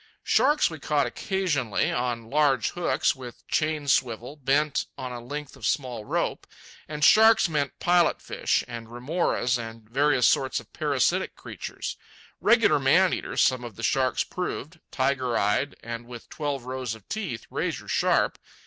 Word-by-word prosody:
Sharks 300 +1 +3
we 160 -2 -7
caught 145 0 +1
occasionally, 170 - -1
on 120 -2 -2
large 140 -6 +2
hooks, 155 -5 +1
with 125 -3 -11
chain 155 -2 0
swivels, 125 +2 0
bent 145 +2 +1
on 130 -1 -5
a 120 - -6
length 145 +4 -7
of - - -17
small 125 -6 -1
rope. - - -2 0.4
And 150 -1 -4
sharks 220 +1 +7
meant 145 -4 -2
pilot 175 -1 +3
fish, - - -1
and 115 -2 -7
remoras, 125 -1 0
and 115 -1 -8
various 135 +1 +3
sorts 135 -1 +2
of - - -16
parasitic - - 0
creatures. - - -6 0.4
Regular - - +4
man - - +4
eaters - - -1
some 130 -1 +2
of 120 -4 -8
the 115 - -9
sharks 130 +2 +1
proved, 165 -3 -5
tiger 130 -3 0
eyed 105 +8 +1
and 115 0 -6
with 120 -2 -10
twelve 145 -4 -3
rows 130 -3 -4
of 110 -2 -17
teeth, 185 - -4
razor - - -3
sharp. - - +1
130 Hz, 155 wpm, -26 LUFS, 120-150 Hz, 0.4 s, sharks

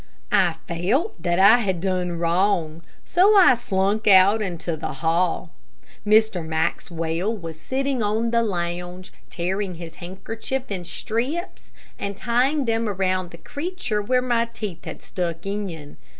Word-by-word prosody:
I 175 -4 +3
felt 205 - -1
that 175 0 0
I 200 +6 +7
had 190 -6 -1
done 180 -1 -1
wrong, 170 -1 +1 0.2
so 390 +5 +4
I 365 -9 +8
slunk 210 -2 0
out 200 +2 +6
into 175 -4 -3
the 155 - -5
hall. 165 +4 0 0.5
Mr. 215 -4 +3
Maxwell 165 +4 -2
was 165 -4 -8
sitting 270 -1 -1
on 220 +2 0
the 235 0 +3
lounge, 180 -2 -4 0.2
tearing 185 +2 -2
his 165 -1 -9
handkerchief 225 +8 -5
in 180 -3 -4
strips 250 - -4 0.3
and 200 -1 -4
tying 260 +6 +1
them 225 -1 0
around 185 -2 -1
the 170 - -12
creature 285 - -3
where 250 +4 +1
my 240 -2 +1
teeth 210 -7 -7
had - - -8
stuck 170 -1 -4
in. 190 -8 -5
195 Hz, 140 wpm, -23 LUFS, 175-230 Hz, 0.5 s, I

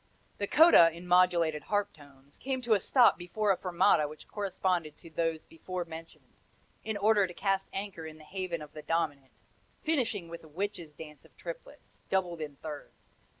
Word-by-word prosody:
The 200 - -1
coda, 300 - +8
in 170 +2 -10
modulated 175 -4 +3
harp 205 -1 0
tones, 140 -1 -18
came 265 -1 -3
to 235 -2 +3
a 205 - +4
stop 245 +3 +4
before 200 +4 0
a - - +3
fermata 175 -4 +3
which 150 0 -12
corresponded 180 -6 -2
to 165 - -14
those 165 -1 -1
before 180 +2 -6
mentioned, 165 0 -11 0.5
in 220 -1 -3
order 205 -1 +4
to 175 - -10
cast 195 -1 0
anchor 195 -5 -5
in 155 0 -10
the 155 - -15
haven 175 -1 -4
of 150 - -13
the 155 - -8
dominant, 150 -5 -1 0.5
finishing 240 - 0
with 170 0 -9
a - - -13
witches' 175 -1 -5
dance 150 -2 -11
of - - -23
triplets, - - -10
doubled 175 -4 0
in 145 -2 -5
thirds. 150 0 -10
175 Hz, 180 wpm, -30 LUFS, 155-200 Hz, 0.5 s, coda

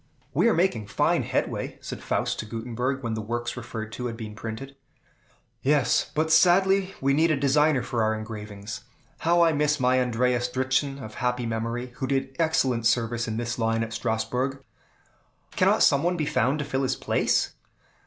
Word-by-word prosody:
"We 235 - +4
are - - +3
making 160 - +1
fine - - +2
headway," - - -2
said - - -7
Faust - - -1
to 110 - -4
Gutenberg, 125 +4 -3
when 115 -1 -2
the 110 - -3
works 120 +2 -3
referred 110 -2 -6
to 125 +2 -4
had 115 -1 -5
been 110 -2 -7
printed. 115 +5 -7 0.9
"Yes, 140 -3 +2
but 155 +1 +2
we 160 - -3
sadly 190 +3 +4
need 145 +5 +3
a 155 - +2
designer 140 0 +3
for 115 - -2
our 110 0 +2
engravings. 105 -1 -7 0.4
How 170 +1 +4
I 165 - +4
miss 150 0 +1
my 130 0 +3
Andreas 125 0 +1
Dritzhn, 130 +2 0
of 110 -4 -8
happy 125 0 -1
memory, 115 +2 -3
who 130 - -2
did 135 0 -1
excellent 130 -8 +2
service 120 0 0
in 110 0 -3
this 120 +1 -3
line 115 0 +1
at 115 0 -6
Strasbourg." 120 +4 -2 0.9
"Cannot - - +4
some 140 - +5
one 175 +1 0
be 155 - 0
found 135 0 +1
to 150 - -3
fill 135 0 -1
his 130 - 0
place?" - - +1
125 Hz, 180 wpm, -26 LUFS, 115-140 Hz, 0.9 s, some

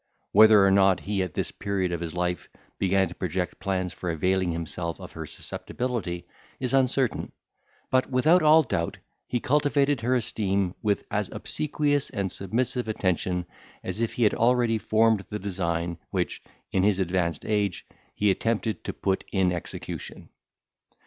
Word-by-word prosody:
Whether 105 -1 +7
or 95 - +5
not 95 -1 +4
he 100 0 -1
at 90 -4 -3
this - - -2
period 95 -3 -2
of 85 - -2
his 85 0 -5
life 90 0 -2 0.3
began 95 0 +2
to 85 - -9
project 90 0 -3
plans 95 -2 -2
for 90 - -5
availing 90 +2 +1
himself 85 0 -4
of - - -9
her - - -7
susceptibility, 110 -9 -4 0.3
is 130 0 -2
uncertain; 130 -2 +1 0.6
but, 130 0 +2
without 155 +8 +4
all 155 +1 +6
doubt, 85 - -2 0.3
he 120 - -1
cultivated 145 -1 +2
her 125 +3 +2
esteem 100 -5 0
with 105 -2 0
as - - -1
obsequious 145 -1 0
and 95 -2 -2
submissive 120 +4 -1
attention 90 -3 -1 0.4
as 95 +5 -3
if 115 - 0
he 120 - 0
had 105 - +4
already 120 -1 +2
formed 110 -1 +3
the 105 - -3
design, 85 -4 -2
which, - - -2 0.3
in 95 - +2
his 100 0 +3
advanced 90 -3 0
age, 105 -4 0 0.3
he 105 -1 +3
attempted 110 0 -1
to - - -4
put 95 -1 -1
in 95 -2 +2
execution. 85 -1 -6
100 Hz, 155 wpm, -26 LUFS, 90-120 Hz, 0.6 s, Whether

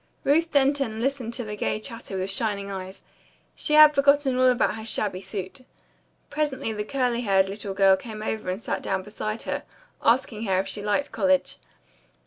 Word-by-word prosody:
Ruth 325 +4 +3
Denton 275 -5 +1
listened 245 -2 -2
to 245 - -3
the 210 -1 -6
gay 210 - -1
chatter 230 -4 -5
with 190 +1 -2
shining 200 -1 -1
eyes. 190 0 -7 0.5
She 300 - 0
had 305 0 +9
forgotten 280 -1 +3
all 255 0 +4
about 245 -6 +2
her 220 0 -7
shabby 205 -4 -1
suit. 195 +3 -6 0.7
Presently 285 -7 -2
the 210 -1 -3
curly 245 0 -1
haired 195 -4 +3
little 195 0 -5
girl 195 -1 +5
came 215 +1 -8
over 220 -3 -3
and 185 +2 -2
sat - - -3
down 190 -1 -2
beside 215 +2 -5
her, - - -3 0.4
asking 230 -2 +1
her 190 -2 +1
if 190 +1 0
she 205 - -4
liked 210 +8 -1
college. 190 -4 +1
220 Hz, 180 wpm, -25 LUFS, 195-260 Hz, 0.7 s, had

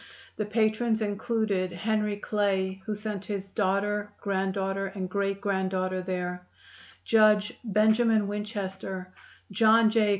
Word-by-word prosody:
The 210 - -3
patrons 220 +1 +1
included 205 -3 -1
Henry 210 +3 -1
Clay, 195 -2 -1
who 215 - -1
sent 210 -2 -5
his 195 -2 -5
daughter, 205 +1 0
granddaughter 195 0 -1
and 190 -1 -5
great 195 +1 -1
granddaughter 185 -2 -1
there; 180 -1 -4 0.6
Judge 215 0 +4
Benjamin 220 0 +3
Winchester, 195 -3 -5 0.4
John 220 +2 +5
J. 220 -2 +3
205 Hz, 110 wpm, -28 LUFS, 190-215 Hz, 0.6 s, John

